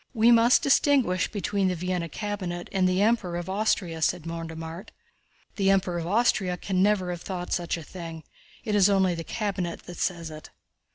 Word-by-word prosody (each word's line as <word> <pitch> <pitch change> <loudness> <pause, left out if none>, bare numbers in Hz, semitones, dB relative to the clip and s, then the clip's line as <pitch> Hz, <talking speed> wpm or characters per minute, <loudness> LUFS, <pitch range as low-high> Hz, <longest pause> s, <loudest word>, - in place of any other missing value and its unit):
"We 230 +1 +5
must 235 +1 +5
distinguish 270 -9 +3
between 200 -2 0
the 180 - 0
Vienna 180 -1 -2
cabinet 185 -4 -4
and 185 -2 +2
the 185 +2 +2
Emperor 210 -6 +1
of 175 +2 -4
Austria," 190 -5 0
said 170 +1 0
Mortemart. 165 +3 -6 0.7
"The 195 -2 +2
Emperor 190 -3 +2
of 165 - -4
Austria 195 -3 +2
can 185 0 -1
never 195 -3 +2
have 175 -1 -5
thought 180 -2 -5
of - - -1
such 175 -1 -1
a 165 - -8
thing, 165 -2 -8 0.4
it 215 - -2
is 205 -1 +5
only 190 -2 +3
the 165 -1 -5
cabinet 190 -4 -3
that 175 - -10
says 170 -3 -2
it." 155 0 -10
185 Hz, 185 wpm, -26 LUFS, 170-205 Hz, 0.7 s, We